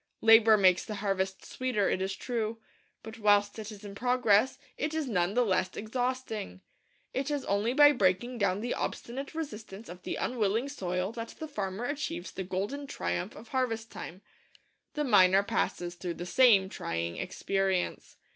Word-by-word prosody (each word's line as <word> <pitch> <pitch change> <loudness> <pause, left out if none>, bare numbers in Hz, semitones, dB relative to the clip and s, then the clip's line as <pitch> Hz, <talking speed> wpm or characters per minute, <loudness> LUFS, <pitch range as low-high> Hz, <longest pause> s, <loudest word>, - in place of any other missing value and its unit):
Labour 225 -1 +7
makes 185 -3 +4
the 215 - -5
harvest 195 -2 -2
sweeter, 250 -6 -1
it 185 - 0
is 190 0 -2
true; 225 -1 -3 0.5
but 220 +1 -9
whilst 205 0 +3
it 215 0 -6
is 210 0 -11
in 200 - -7
progress 245 +1 +2 0.2
it 305 +2 -2
is 315 -3 -1
none 185 -3 0
the 245 0 +3
less 185 -2 0
exhausting. 225 - -3 0.5
It 270 +2 -1
is 290 -2 -2
only 205 +4 +1
by 290 +1 +8
breaking 235 +1 +1
down 200 -1 +1
the 240 +2 -1
obstinate 275 +5 -4
resistance 225 -8 -7
of 180 +1 -9
the - - -4
unwilling 230 +2 0
soil 180 -6 -2
that 230 0 -7
the 315 - -6
farmer 205 -4 -4
achieves 275 - -4
the 190 - -5
golden 200 +11 -3
triumph 90 - -3
of 220 +2 -12
harvest 230 -4 -1
time. 185 +4 -8 0.7
The 300 - 0
miner 195 -6 +5
passes 175 -3 -1
through 175 -1 -5
the 175 - -6
same 205 -2 +5
trying 85 - -4
experience. 195 -2 -2
210 Hz, 165 wpm, -30 LUFS, 190-245 Hz, 0.7 s, by